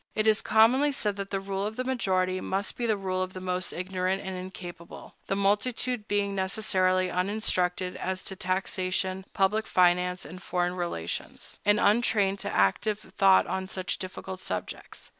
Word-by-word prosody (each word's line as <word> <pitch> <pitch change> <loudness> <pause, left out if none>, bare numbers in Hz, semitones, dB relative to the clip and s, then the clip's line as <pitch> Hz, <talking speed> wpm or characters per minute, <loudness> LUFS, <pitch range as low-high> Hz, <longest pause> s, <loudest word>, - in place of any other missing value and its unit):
It 215 - +1
is 215 -1 +4
commonly 250 +7 +4
said 210 -6 0
that 200 0 -4
the 195 - -1
rule 195 0 -3
of 215 - -6
the 255 - -2
majority 185 -7 0
must 195 +2 -2
be 240 - -2
the 215 -2 +2
rule 185 -1 -2
of 185 0 -3
the 185 - -6
most 185 0 -1
ignorant 185 +1 -2
and 190 -1 -4
incapable, 180 -2 -9
the 195 - 0
multitude 210 +3 0
being 205 -1 0
necessarily 185 -2 +1
uninstructed 180 -2 0
as 185 0 -3
to 190 - -6
taxation, 185 0 -1
public 210 +3 +2
finance, 180 0 +3
and 185 +2 -9
foreign 175 0 -1
relations, 170 - -4
and 205 0 +5
untrained 205 -2 +3
to - - -4
active 100 - +2 0.2
thought 95 -1 +5
on 190 0 -3
such 185 -1 -3
difficult 185 0 -6
subjects. 95 - -5
190 Hz, 165 wpm, -28 LUFS, 185-205 Hz, 0.2 s, and